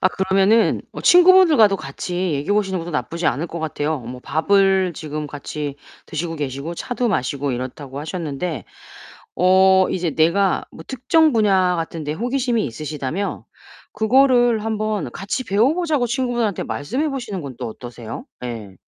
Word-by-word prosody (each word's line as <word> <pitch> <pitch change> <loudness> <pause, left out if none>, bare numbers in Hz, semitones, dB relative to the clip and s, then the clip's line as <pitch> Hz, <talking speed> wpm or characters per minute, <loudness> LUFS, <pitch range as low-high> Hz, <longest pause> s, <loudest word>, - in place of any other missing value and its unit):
아 185 - +4
그러면은 195 +4 +2
어 - - -7
친구분들과도 350 - +6
같이 175 +3 -3
얘기해 145 +8 -1
보시는 195 -3 0
것도 170 +1 -6
나쁘지 165 +2 -2
않을 150 +8 0
것 170 - -6
같아요. 155 -2 -2
뭐 125 +2 -8
밥을 190 +4 +2
지금 150 0 -5
같이 145 0 -6 0.3
드시고 165 +1 -4
계시고 145 +3 -4
차도 245 +4 -2
마시고 140 -5 -1
이렇다고 130 +2 -6
하셨는데 160 -1 -4 0.7
어 190 +1 +5
이제 175 -3 -1
내가 175 +6 +2
뭐 - - -11
특정 310 +5 +2
분야 190 -5 +3
같은 165 -1 -4
데 150 - -2
호기심이 245 - -1
있으시다면 150 - -4 0.5
그거를 240 0 +3
한번 215 - -2
같이 200 - -4
배워 225 +9 +2
보자고 315 -8 0
친구분한테 240 -5 -1
말씀해 255 - -2
보시는 240 -8 -4
건 135 -4 -8
또 125 - -4
어떠세요? 120 - -8 0.2
예. 110 -5 -6
185 Hz, 345 characters per minute, -21 LUFS, 150-225 Hz, 0.7 s, 친구분들과도